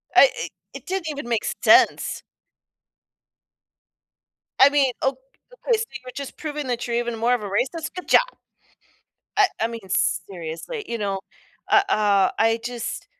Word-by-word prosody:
I - - +8
it 475 - -5 0.2
it - - -10
didn't 375 -3 -3
even 285 -4 -5
make 230 -2 0 0.2
sense. - - +4 2.4
I 270 +1 +9
mean, 280 -2 +3
ok 270 0 +1 0.5
okay, 475 -2 +4
so 445 - -1 0.2
you're 255 - -9
just 280 -1 -7
proving 300 -3 -5
that 240 -1 -2
you're 235 - -1
even 240 -1 -2
more 235 +2 +2
of 245 - 0
a 210 - -5
racist, 270 - -2
good 365 - -7
job. - - +7 1.2
I 405 -2 +6
I 225 - +2
mean, 230 -4 -8
seriously, 185 - -2
you 235 - -3
know? 200 -2 -2 0.5
Uh, 400 - +7
uh, 200 -2 +3
I 225 +1 +3
just 240 -1 -5
245 Hz, 155 wpm, -23 LUFS, 220-300 Hz, 2.4 s, I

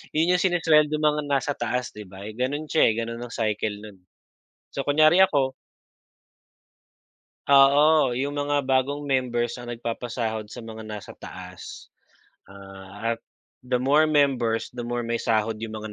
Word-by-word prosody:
'Yon 165 +3 +3
'yung 180 - +1
sinesuweldo 155 -4 +3
ng 155 - -1
mga 150 0 +2
nasa 140 +1 0
taas 120 +1 -2
'di 105 -1 -9
ba? 95 +1 -10
Eh, 110 - -7
gano'n 140 +5 -2
siya, 160 - +3
eh. - - +1
Gano'n 115 +1 -4
ang 120 - -7
cycle 105 -1 -1
no'n. 105 -3 -12 0.8
So, 140 - -2
kunyari 155 +5 +5
ako 135 -7 +2 2.0
Oo, 140 -1 +5
'yung 140 +2 -1
mga 145 -1 0
bagong 135 +2 0
members 125 -3 -1
ang 120 - -9
nagpapasahod 115 -2 -4
sa 120 +1 -9
mga 110 0 -9
nasa 105 -2 -8
taas. 90 0 -11 0.6
Ah, 100 +3 -6
at - - -26 0.5
the 125 0 0
more 150 +4 +4
members, 130 -8 +1
the 120 -1 -6
more 120 0 -3
may 115 0 -2
sahod 110 -1 0
'yung 110 -1 -5
mga 110 0 -7
120 Hz, 160 wpm, -25 LUFS, 110-145 Hz, 2.0 s, kunyari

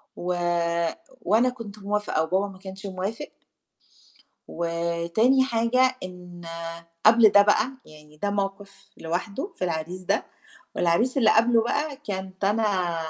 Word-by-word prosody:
و 180 +1 -2 0.9
وأنا 225 +7 +3
كنت 225 -5 -9
موافقة 205 -5 -1
وبابا 190 +5 0
ما 190 -2 -12
كانش 190 +1 -9
موافق 195 +8 -4 1.2
وتاني 170 +9 +1
حاجة 255 +1 +2
إن 180 -1 -10 0.6
قبل 225 0 +8
ده 205 - +7
بقى، 210 +4 +3
يعني 150 0 -16
ده 205 +6 -1
موقِف 200 0 -4
لوحده 200 - -4
في 185 - -2
العريس 170 +2 -4
ده، 185 - 0 0.5
والعريس 175 +11 +2
اللي 225 -5 +5
قبله 230 +1 +4
بقى 285 +5 -1
كانت 190 -7 -6
أنا 195 -4 +1
200 Hz, 125 wpm, -25 LUFS, 180-225 Hz, 1.2 s, قبل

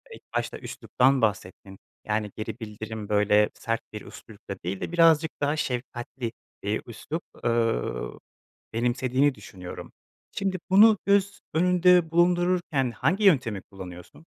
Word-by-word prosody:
ilk - - -15
başta - - -2
üsluptan 130 0 +1
bahsettin. 95 -2 -2 0.3
Yani, 105 -1 -1
geri 110 +2 -6
bildirim 110 -1 -7
böyle 105 0 +4
sert 115 -1 -3
bir 105 - -6
üslupla 100 -2 -10
değil 95 +3 -4
de - - -4
birazcık 165 -2 +4
daha 145 +1 +1
şefkatli, 125 -3 -4 0.3
eee, 105 +2 -1
üslup, 150 +8 -5 0.2
eee, 115 - +2 0.9
benimsediğini 130 +4 +1
düşünüyorum. 95 -3 -10 0.4
Şimdi 195 -1 -2
bunu 210 +3 +7
göz 200 0 +2
önünde 180 0 +4
bulundururken 175 -6 +2
hangi 190 - 0
yöntemi 125 - +3
kullanıyorsun? 90 - -11
125 Hz, 120 wpm, -26 LUFS, 105-170 Hz, 0.9 s, bunu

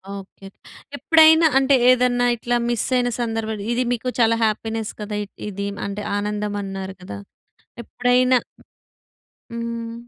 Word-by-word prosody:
Okay. 195 0 -11 0.5
ఎప్పుడైనా 320 +3 +6
అంటే, 270 +1 +4
ఏదన్నా 250 -1 +3
ఇట్లా 240 +1 -1
మిస్సయిన 245 +1 0
సందర్భాలు, 225 -2 -3
ఇది 240 +1 +1
మీకు 245 +1 -3
చాలా 230 -1 +4
హ్యాపీనెస్ 220 0 -2
కదా 210 0 -5
ఇ - - -10 0.2
ఇది. 200 0 -4 0.2
అంటే, 200 +1 -5 0.2
ఆనందమన్నారు 205 -2 -4
కదా! 100 - -8 0.7
ఎప్పుడైనా 250 +2 +2 1.2
హ్మ్. 230 0 -5
230 Hz, 115 wpm, -21 LUFS, 210-245 Hz, 1.2 s, ఎప్పుడైనా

